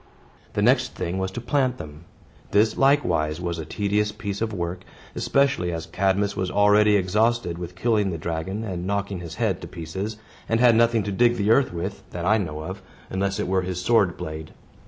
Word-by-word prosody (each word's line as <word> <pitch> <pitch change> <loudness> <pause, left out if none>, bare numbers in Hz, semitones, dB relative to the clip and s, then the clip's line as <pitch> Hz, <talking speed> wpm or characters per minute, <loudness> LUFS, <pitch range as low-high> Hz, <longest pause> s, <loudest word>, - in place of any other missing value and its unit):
The - - 0
next - - +3
thing 90 +3 -3
was 95 0 -1
to 95 - -6
plant 130 +1 0
them. 75 0 -10 0.4
This, 105 +2 +3
likewise, 85 - +2
was 85 -2 -3
a 80 - -5
tedious 105 +3 0
piece 100 -2 -5
of 115 -1 0
work, 90 -2 -4 0.3
especially 140 -10 +1
as 80 -1 -4
Cadmus 95 +4 0
was 95 -1 -1
already 105 +2 +4
exhausted 105 -1 +1
with 90 0 -7
killing 105 +1 +1
the 85 - -3
dragon 85 +6 -3
and 90 -4 -4
knocking 100 -1 -2
his 85 -2 -7
head 100 -4 0
to 85 - -7
pieces, 95 +5 -5 0.3
and 115 - +2
had 120 -2 +6
nothing 115 -1 +3
to 100 - -3
dig 120 +4 +3
the 105 +1 +2
earth 130 +3 +4
with, 85 -1 -4
that 85 -1 -5
I 110 +3 +4
know 75 -5 -4
of, 95 +5 -6 0.3
unless 95 +1 -1
it - - -1
were 95 0 +2
his 90 -1 -3
sword 100 -3 +2
blade. 80 0 -7
95 Hz, 200 wpm, -24 LUFS, 85-110 Hz, 0.4 s, had